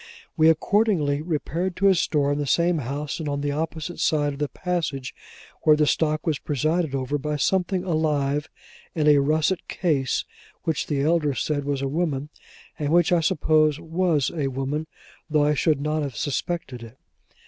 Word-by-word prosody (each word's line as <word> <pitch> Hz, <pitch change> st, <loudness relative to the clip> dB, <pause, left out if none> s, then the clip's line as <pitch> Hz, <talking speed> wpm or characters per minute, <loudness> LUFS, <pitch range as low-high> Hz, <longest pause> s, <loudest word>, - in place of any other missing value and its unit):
We 160 Hz, 0 st, +5 dB
accordingly 160 Hz, -4 st, +2 dB
repaired 170 Hz, +3 st, -2 dB
to 200 Hz, -, +2 dB
a 195 Hz, -, +6 dB
store 150 Hz, -4 st, +1 dB
in 145 Hz, -, -1 dB
the 145 Hz, -, -2 dB
same 170 Hz, +2 st, +2 dB
house 140 Hz, +4 st, -4 dB
and 155 Hz, -2 st, -3 dB
on 140 Hz, 0 st, -2 dB
the 145 Hz, 0 st, -1 dB
opposite 160 Hz, +2 st, -4 dB
side 145 Hz, -2 st, +1 dB
of 140 Hz, -, -10 dB
the 150 Hz, -, 0 dB
passage, 160 Hz, -7 st, -3 dB, 0.5 s
where 155 Hz, -, +5 dB
the 150 Hz, 0 st, +3 dB
stock 155 Hz, 0 st, 0 dB
was 155 Hz, -4 st, 0 dB
presided 155 Hz, +1 st, -1 dB
over 135 Hz, +2 st, -2 dB
by 150 Hz, +1 st, -2 dB
something 185 Hz, +4 st, 0 dB
alive 150 Hz, -4 st, 0 dB, 0.5 s
in 155 Hz, -2 st, +1 dB
a 150 Hz, -1 st, +6 dB
russet 155 Hz, +5 st, +1 dB
case, 140 Hz, -7 st, 0 dB, 0.4 s
which 160 Hz, -3 st, -1 dB
the 140 Hz, -2 st, 0 dB
elder 155 Hz, -3 st, +2 dB
said 145 Hz, 0 st, -1 dB
was 140 Hz, -1 st, -1 dB
a -, -, 0 dB
woman; 150 Hz, -2 st, -2 dB, 0.5 s
and 145 Hz, -1 st, -1 dB
which 175 Hz, +2 st, +4 dB
I 175 Hz, -, +4 dB
suppose 155 Hz, -1 st, +2 dB
was 165 Hz, -3 st, 0 dB
a 145 Hz, -4 st, 0 dB
woman, 135 Hz, +4 st, -3 dB, 0.4 s
though 150 Hz, -1 st, +3 dB
I 150 Hz, -, +3 dB
should 150 Hz, 0 st, +1 dB
not 150 Hz, +2 st, -1 dB
have 140 Hz, -5 st, -4 dB
suspected 145 Hz, -3 st, -3 dB
it. 115 Hz, +2 st, -12 dB
150 Hz, 180 wpm, -24 LUFS, 145-165 Hz, 0.5 s, a